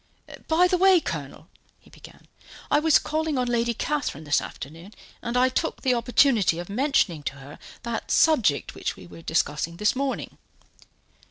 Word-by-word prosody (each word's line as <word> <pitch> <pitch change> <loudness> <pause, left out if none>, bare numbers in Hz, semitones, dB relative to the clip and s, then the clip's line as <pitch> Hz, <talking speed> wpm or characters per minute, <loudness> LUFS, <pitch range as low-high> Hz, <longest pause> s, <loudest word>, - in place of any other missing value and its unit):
"By 340 +3 +4
the 360 0 0
way, 380 -1 +6
Colonel," - - -6 0.3
he - - -23
began, - - -16 0.5
"I - - +5
was 315 0 +5
calling 310 -1 -2
on 250 -1 0
Lady 235 -1 0
Catherine 285 - -2
this 145 -2 +1
afternoon, 165 +9 -10 0.3
and 235 +1 -2
I 255 +1 +5
took 290 +5 -2
the 255 - +3
opportunity 235 - +3
of 175 +2 -6
mentioning 225 - +1
to 140 - -4
her 140 +1 -12 0.2
that 235 -1 -4
subject 240 - +3
which - - -4
we - - -13
were 170 - -13
discussing 160 0 -1
this 210 +5 +1
morning." 275 0 -3
240 Hz, 165 wpm, -25 LUFS, -, 0.5 s, way